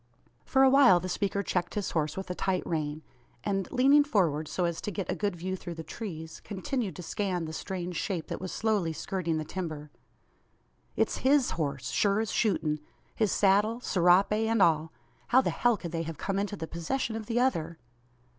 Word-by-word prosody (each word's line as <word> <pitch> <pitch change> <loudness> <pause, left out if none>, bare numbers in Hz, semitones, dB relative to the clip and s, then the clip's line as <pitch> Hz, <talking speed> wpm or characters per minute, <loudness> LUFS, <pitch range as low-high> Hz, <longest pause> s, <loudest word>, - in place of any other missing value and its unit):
For 265 0 +4
a 265 - +7
while 260 -10 +7
the 180 - -5
speaker 200 +2 -1
checked 175 -2 -2
his 205 -2 -2
horse 155 -1 -1
with 190 -1 -4
a - - -1
tight 185 0 -1
rein. 155 -2 -2 0.4
And, 195 -2 -1
leaning 275 +3 +5
forward, 170 - +1
so 180 - -1
as 170 -1 -2
to - - -3
get 195 -2 -3
a - - -1
good 205 -3 -1
view 185 +2 -3
through 175 -2 -7
the 160 - -6
trees, 160 -3 -7
continued 210 +2 -3
to 180 - -7
scan 180 -1 -2
the 160 - -6
strange 180 0 -4
shape 180 -6 -2
that - - -6
was 185 - -4
slowly 205 -7 0
skirting 170 -1 -2
the 155 - -3
timber. 155 -4 -5 1.0
"It's - - +1
his 270 0 +3
horse 140 -5 -3
sure 200 0 +2
as 220 -1 -1
shootin'! 155 -8 +1 0.3
His 215 -4 +1
saddle, 210 +4 +3
serape, 180 -3 +4
and 220 +1 +1
all. 160 -3 +3 0.4
How 250 - +5
the 265 - +1
hell 240 -2 +2
could 170 -3 -6
they 165 -1 -2
have 165 -2 -5
come 195 0 -2
into 205 +1 -2
the 165 - -5
possession 195 +9 -3
of 220 -1 -5
the 235 0 +1
other?" 170 -11 0
185 Hz, 200 wpm, -29 LUFS, 165-215 Hz, 1.0 s, a